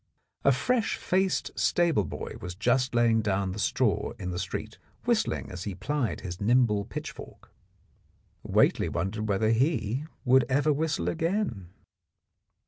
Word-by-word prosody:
A 140 - +6
fresh 225 - +1
faced 190 +1 0
stable 170 -3 +2
boy - - -6
was 90 0 -6
just 125 +5 +1
laying 115 -1 +4
down 100 -2 0
the 100 - -6
straw - - +1
in 90 - -4
the 90 - -3
street, - - -5 0.3
whistling - - 0
as 90 0 -6
he 100 -3 -4
plied 130 +5 -2
his 90 0 -6
nimble 105 -2 +3
pitchfork. - - -8 0.9
Whately - - +2
wondered 105 +3 -2
whether 110 +2 +2
he 125 0 +1 0.2
would 130 0 +5
ever 145 +3 +3
whistle 145 - -1
again. 160 - -1
115 Hz, 135 wpm, -28 LUFS, 100-145 Hz, 0.9 s, A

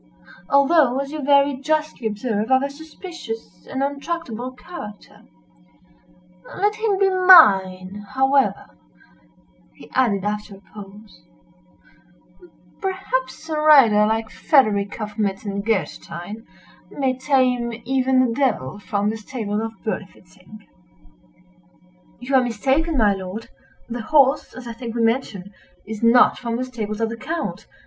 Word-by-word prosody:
although, 280 -2 +4
as 275 0 -4
you 305 -1 -5
very 280 0 +3
justly 305 -4 -1
observe, 215 0 -2
of 260 +1 +4
a 280 - -3
suspicious 315 -5 -9
and 270 0 -2
untractable 280 -4 -4
character; 210 - -11 1.4
let 415 +1 +1
him 435 -3 0
be 390 0 +3
mine, 205 - +5
however," 265 - +1 1.0
he - - -16
added, 205 -7 +1
after 210 -1 -4
a 195 - -17
pause, 205 0 -13 1.6
"perhaps 320 -8 -3
a 315 - -3
rider 255 -9 +6
like 220 0 -2
Frederick 215 -8 +2
of 210 -1 -6
Metzengerstein, 200 -1 -3 0.4
may 265 -2 -1
tame 255 -3 +1
even 260 0 +2
the 235 - -1
devil 215 - -1
from 205 0 -1
the 225 - -5
stables 215 -2 -4
of 225 0 -7
Berlifitzing." 195 -1 -8 1.5
"You 250 +3 -6
are 260 -1 +5
mistaken, 270 +7 0
my 210 -4 +4
lord; 195 +3 -7 0.4
the 240 0 -5
horse, 280 +2 +2
as 255 -1 -9
I 235 - -5
think 230 0 -7
we 235 - 0
mentioned, 220 -5 -1 0.3
is 215 0 -7
not 235 +2 +5
from 235 -2 -3
the 250 - -2
stables 220 -4 -5
of 225 - 0
the 230 - -6
Count. 320 +7 -5
240 Hz, 125 wpm, -21 LUFS, 210-275 Hz, 1.6 s, rider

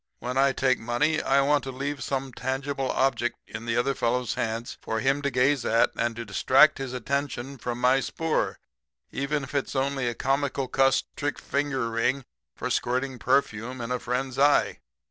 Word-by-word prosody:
When 125 +1 -4
I 135 +1 +4
take 130 -1 +1
money 135 +8 +1
I 135 +1 +3
want 145 0 +2
to 135 - -4
leave 140 +1 -4
some 135 0 -3
tangible 135 +1 -2
object 120 -3 +1
in 110 +2 -8
the 115 0 0
other 135 +3 +2
fellow's 125 -2 0
hands 115 +1 -3
for 110 - -2
him 135 +3 +1
to 140 - 0
gaze 130 +1 +2
at 115 +1 +3
and 115 0 -1
to 115 0 -6
distract 135 +9 +4
his 135 -2 -4
attention 135 +1 -3
from 120 0 -4
my 125 +2 +4
spoor, 160 +3 -1 0.5
even 140 +1 -1
if 140 - -9
it's 140 -1 -2
only 135 -1 0
a 120 - -2
Komical 135 0 0
Kuss 135 0 +3
Trick 145 0 -2
Finger 135 -5 -1
Ring 120 +4 0 0.3
for - - -4
Squirting 130 +1 -1
Perfume 125 -1 0
in 120 +1 -4
a 125 - 0
Friend's 125 +2 -3
Eye. 145 +1 +3
130 Hz, 185 wpm, -26 LUFS, 120-140 Hz, 0.5 s, I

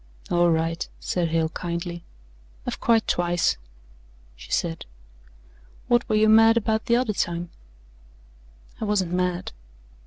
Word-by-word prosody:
"All 175 0 +4
right," 165 0 -1
said 175 -2 -1
Hale 160 0 0
kindly. 170 0 -5 0.6
"I've - - -4
cried 225 -2 +3
twice," 175 -1 +1 0.8
she - - -13
said. 165 -1 -1 1.0
"What 240 0 +2
were 215 - +2
you 215 0 +4
mad 225 +1 +6
about 220 -1 0
the 235 - +4
other 240 -3 +1
time?" 175 -2 -2 1.3
"I - - -4
wasn't 195 -4 0
mad." 180 0 -1
175 Hz, 125 wpm, -24 LUFS, 170-220 Hz, 1.3 s, mad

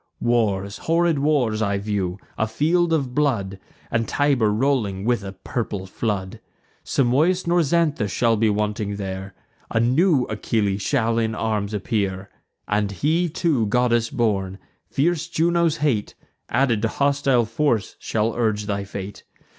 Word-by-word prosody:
Wars, 105 -4 0
horrid 165 -2 +3
wars, 135 -7 +1
I 100 -2 +1
view; 100 -3 -2 0.2
a 110 - 0
field 165 +9 +1
of 140 -6 0
blood, 110 -10 0 0.3
And 115 -1 0
Tiber 135 -7 +2
rolling 105 -5 0
with 120 -3 +1
a 95 0 -6
purple 100 -1 -4
flood. 95 -1 -3 0.4
Simois 150 +9 +2
nor 175 +1 +3
Xanthus 150 - +1
shall 115 +3 +2
be 110 0 +2
wanting 105 0 -1
there: 95 -1 -6 0.3
A 115 - +1
new 135 +5 +3
Achilles 105 -2 -1
shall 115 -1 +1
in 110 -1 -1
arms 105 -2 -1
appear, 100 -2 -2 0.4
And 105 -1 0
he, 160 - +1
too, 150 - +1
goddess 120 0 +2
born. 100 -7 -1 0.3
Fierce 160 +3 0
Juno's 170 -1 +1
hate, 135 -9 0 0.3
Added 120 -5 +2
to 115 - +2
hostile 140 -1 +2
force, 115 -1 0
shall 110 +1 -1
urge 110 -3 0
thy 100 -1 -2
fate. 100 0 -7
115 Hz, 140 wpm, -22 LUFS, 105-140 Hz, 0.4 s, horrid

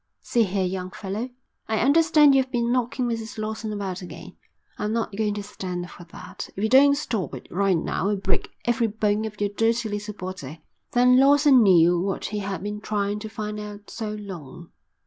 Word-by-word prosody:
"See 235 -2 +2
here, 190 0 -1
young 185 0 -3
fellow, 205 +6 -5 0.4
I 220 - 0
understand 295 +3 +5
you've 265 -1 +3
been 235 -2 0
knocking 245 0 0
Mrs 225 -2 -4
Lawson 220 0 -4
about 195 -3 -4
again. 180 - -10 0.4
I'm 210 +1 -1
not 225 -3 -2
going 210 -1 0
to 205 - -4
stand 180 -3 -6
for 175 - -12
that. 170 - -9
If 195 - -4
you 220 - +2
don't 280 +2 +6
stop 205 - -3
it 130 - -10
right 195 -1 +2
now 185 +4 -1
I'll 210 - +1
break 195 -1 -1 0.2
every 240 -1 +2
bone 215 0 0
of 210 -1 -7
your 205 -1 0
dirty 225 +2 +1
little 205 0 -4
body." 180 -6 -7 0.3
Then 250 +1 +5
Lawson 280 -1 +6
knew 175 -4 +5
what 195 +2 -2
he 210 0 -3
had 195 -3 -4
been 210 0 -4
trying 205 -1 -1
to 220 +1 -7
find 210 -1 -5
out 210 -1 -9
so 220 -2 -4
long. 175 -6 -9
210 Hz, 195 wpm, -24 LUFS, 195-230 Hz, 0.4 s, don't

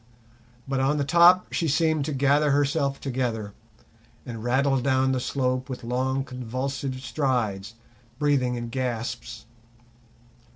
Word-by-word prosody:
But 135 0 -1
on 135 +3 +2
the 145 - +1
top 170 +5 +5
she 165 - 0
seemed 155 -1 +1
to 155 - -3
gather 140 +2 +2
herself 140 0 +1
together, 120 -6 -3 0.7
and 115 -3 -7
rattled 135 +1 +1
down 130 0 +2
the 130 - 0
slope 130 0 -1
with 130 -1 -6
long, 130 +3 -1
convulsive 130 +1 -4
strides, 115 -6 -1 0.4
breathing 135 -4 +1
in 120 -1 -5
gasps. 120 -1 -4
130 Hz, 125 wpm, -25 LUFS, 125-140 Hz, 0.7 s, top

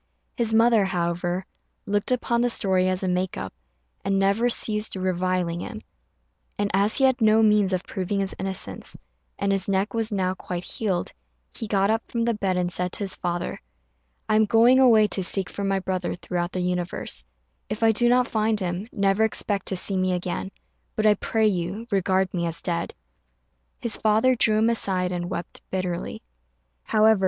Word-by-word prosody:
His 235 -3 -1
mother, 225 -2 +4
however, 175 0 -1 0.4
looked 205 +4 0
upon 235 -1 +1
the 245 - +2
story 190 -5 +2
as 185 +1 -2
a - - 0
make 180 0 -1
up, 95 - -5 0.5
and 195 0 +1
never 200 +5 +2
ceased 215 -3 0
reviling 185 -2 -1
him; - - -6 0.8
and, 205 0 -1
as 200 +3 +2
he 270 - +1
had 260 -1 +3
no 220 0 +5
means 210 -2 +4
of 185 0 -1
proving 195 +1 -3
his 195 -1 -1
innocence, 190 - -4 0.4
and 200 - 0
his 195 0 0
neck 195 +2 0
was 225 -1 -1
now 185 -2 0
quite 180 -1 -6
healed, 190 -4 -2 0.4
he 225 - -6
got 200 0 +2
up 225 +1 +1
from 230 -1 -1
the 235 - +1
bed 195 -3 -1
and 180 -1 0
said 180 0 -1
to - - -3
his 195 - -1
father, 175 0 -3 0.7
"I 215 - +2
am 220 - +5
going 230 +5 +5
away 230 -5 +6
to 190 - -1
seek 185 -1 +1
for 200 - -5
my 195 -1 +1
brother 185 -1 -2
throughout 175 0 -3
the 185 - -2
universe; 180 - -2 0.5
if 215 +2 -3
I 225 - +6
do 240 +2 +3
not 250 +1 +4
find 220 -3 0
him, 180 +2 -3
never 200 0 +2
expect 205 -2 -1
to 190 - 0
see 190 +1 0
me 185 0 +1
again, 180 +1 -3 0.5
but 215 - 0
I 210 - +7
pray 220 +2 0
you 195 +2 -1
regard 190 -1 +1
me 170 -2 -1
as 165 0 0
dead." 170 -2 -2 0.8
His 235 - +1
father 220 +4 +3
drew 215 -2 +3
him 225 +2 +3
aside 185 -5 -1
and 175 -1 -3
wept 175 - -6
bitterly. 180 - -3
195 Hz, 185 wpm, -24 LUFS, 180-220 Hz, 0.8 s, I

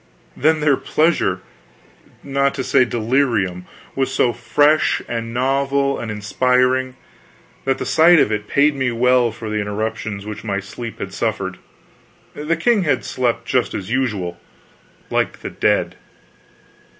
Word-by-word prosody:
Then 155 +1 +2
their 145 -3 +3
pleasure 155 - +1 0.8
not 140 0 0
to 135 - -2
say 130 - +3
delirium 115 -7 0 0.3
was 135 -1 0
so 120 -2 +2
fresh 145 +7 +2
and 115 -1 -4
novel 140 +2 0
and 115 - -5
inspiring 125 +4 +1 0.7
that 135 0 +1
the - - -4
sight 170 +2 +5
of 110 - +3
it 105 -1 -2
paid 145 +1 +3
me 130 -2 0
well 125 0 +3
for 110 0 -8
the 105 0 -2
interruptions 105 0 -4
which 105 -1 -7
my 100 -3 -2
sleep 115 +4 -8
had - - -6
suffered. - - -2 0.7
The 155 +3 -2
king 230 +4 +2
had 145 -7 0
slept 120 -2 -1
just 125 0 0
as 100 +1 -5
usual 105 -10 -1 0.7
like - - -1
the - - -6
dead. - - 0
125 Hz, 140 wpm, -20 LUFS, 110-140 Hz, 0.8 s, sight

